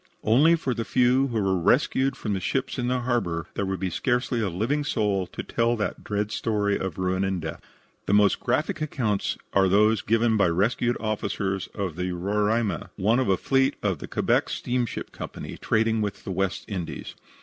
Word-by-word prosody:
Only 140 +10 +5
for 135 -6 -2
the 115 - -2
few 125 +3 +3
who 115 -4 -1
were 95 -2 +1
rescued 130 +9 +2
from 105 - -2
the 95 - -1
ships 130 +7 -2
in 120 - -1
the 125 0 0
harbor 110 -10 -1
there 100 - -2
would 95 0 -2
be 95 -2 -2
scarcely 125 +2 0
a 105 - 0
living 115 - -1
soul 105 -8 0
to - - -6
tell 115 +1 +1
that 110 -2 -3
dread 105 0 -2
story 105 -3 0
of 95 -4 -4
ruin 95 +1 0
and 95 -1 -1
death. 80 -1 -6 0.5
The - - +2
most 105 -1 +4
graphic 155 +8 -1
accounts 120 -9 -1 0.2
are 95 -1 +4
those 105 +2 +4
given 115 0 +2
by 100 -3 +4
rescued 115 +7 +1
officers 100 -3 -2
of 95 -6 -3
the 90 0 -2
Roraima, 105 +4 0
one 110 +5 +2
of 130 - +1
the 95 -1 +3
fleet 135 0 +2
of 95 -7 0
the - - -7
Quebec - - +1
Steamship 120 -1 -2
Co., - - -6 0.3
trading 110 0 +1
with 100 -2 -3
the - - -5
West 95 0 -1
Indies. 95 -6 -5
105 Hz, 195 wpm, -25 LUFS, 95-120 Hz, 0.5 s, Only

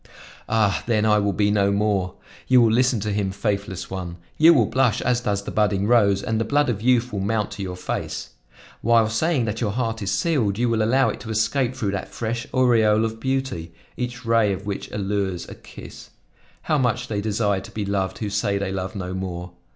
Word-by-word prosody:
Ah! 110 -3 +2
then 110 -2 +2
I 105 -1 +4
will 100 -1 +1
be 105 +1 +1
no 100 -1 +2
more! 100 -3 0 0.3
You 130 -1 +6
will 115 -2 +5
listen 125 0 +2
to 105 +1 -2
him, 100 -1 0
faithless 100 -2 -3
one! 90 -2 -5 0.2
You 160 +2 +7
will 130 -9 +4
blush 130 0 +1
as 125 -1 +1
does 100 -4 -1
the - - -6
budding 100 -2 +1
rose 100 -4 +3
and 110 0 -1
the - - +2
blood 145 +4 +1
of 105 -3 -4
youth 125 0 +2
will 100 - -2
mount 105 +1 -1
to 100 - -7
your 90 -2 -4
face. 90 - -4 0.5
While 115 -1 +4
saying 135 +3 +1
that 110 +2 -3
your 110 - +1
heart 115 -2 -2
is 95 -1 -2
sealed, 120 - +1
you 120 +1 +1
will 115 -1 +1
allow 130 +5 +3
it - - -5
to 115 - -9
escape 120 +4 0
through 105 -6 -2
that 100 - -4
fresh 115 +1 -4
aureole 115 -4 +3
of 110 0 -4
beauty, 130 -11 -3 0.2
each 125 0 -5
ray 115 -3 +3
of 95 +1 -5
which 100 -1 -4
allures 100 -3 -2
a - - -8
kiss. - - -12 0.5
How 155 - +1
much 125 -1 0
they 105 -3 -2
desire 105 -2 0
to - - -12
be 105 -2 -3
loved 100 -1 -1
who 105 -2 -4
say 100 0 0
they 100 -1 -2
love 95 0 -4
no 90 -2 -4
more! 90 -1 -5
105 Hz, 215 wpm, -23 LUFS, 100-120 Hz, 0.5 s, You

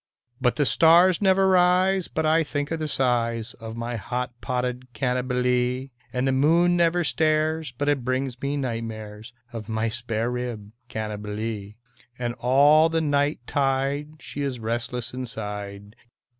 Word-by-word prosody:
But 125 -2 +2
the 145 - +1
stars 165 - +5
never 190 -1 +4
rise 185 0 +3
but 160 - -2
I 160 +1 +4
think 145 -1 -3
of 165 - -2
the 155 - -2
size 120 -4 0
Of 110 -1 -7
my 115 0 -3
hot 125 +3 -3
potted 125 -1 -3
Cannibalee, 125 0 0 0.2
And 130 +1 -1
the - - +3
moon 165 +6 +3
never 175 0 +2
stares 155 -1 +1
but 140 +4 -3
it 145 -3 +1
brings 130 0 -2
me 140 +1 -1
night 120 -4 -2
mares 110 0 -8 0.2
Of 115 -1 -7
my 110 0 0
spare 115 0 -2
rib 120 -4 -5 0.2
Cannibalee; 105 -1 -5 0.4
And 120 -1 -2
all 145 +6 +5
the 165 0 +1
night 145 -3 +1
tide 140 +2 0
she 145 - -6
is 135 -3 -2
restless 120 +1 -3
inside. 105 -4 -6
125 Hz, 150 wpm, -25 LUFS, 115-150 Hz, 0.4 s, stars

